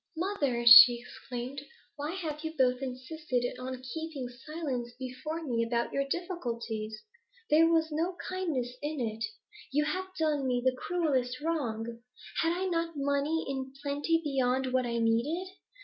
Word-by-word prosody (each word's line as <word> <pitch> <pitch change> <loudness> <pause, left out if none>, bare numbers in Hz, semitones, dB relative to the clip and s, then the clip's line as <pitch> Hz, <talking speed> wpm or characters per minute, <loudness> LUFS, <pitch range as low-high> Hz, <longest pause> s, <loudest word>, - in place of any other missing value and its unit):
'Mother!' 290 -10 0
she 235 +1 +11
exclaimed, 245 +2 -7 0.3
'why 295 +3 -4
have 310 -5 -4
you 320 0 -4
both 255 -1 +3
insisted 255 0 -3
on 255 0 -5
keeping 285 0 -5
silence 255 -2 -5
before 260 +6 -5
me 235 -6 0
about 235 0 -1
your 275 0 0
difficulties? 235 - -4 0.5
There 320 +2 +7
was 325 -1 +2
no 335 +4 -1
kindness 315 -10 -2
in 295 0 -3
it; 225 -2 -2 0.5
you 295 +2 +2
have 375 +4 -2
done 300 -4 +1
me 250 -1 +1
the 260 0 +3
cruelest 260 -6 0
wrong. 235 -8 -2 0.4
Had 330 - +2
I 365 +2 -1
not 335 -2 -1
money 285 +3 0
in 265 -1 -4
plenty 290 +3 +1
beyond 260 -2 0
what 255 -1 +2
I 235 0 -1
needed? 275 +12 0
275 Hz, 150 wpm, -30 LUFS, 245-320 Hz, 0.5 s, she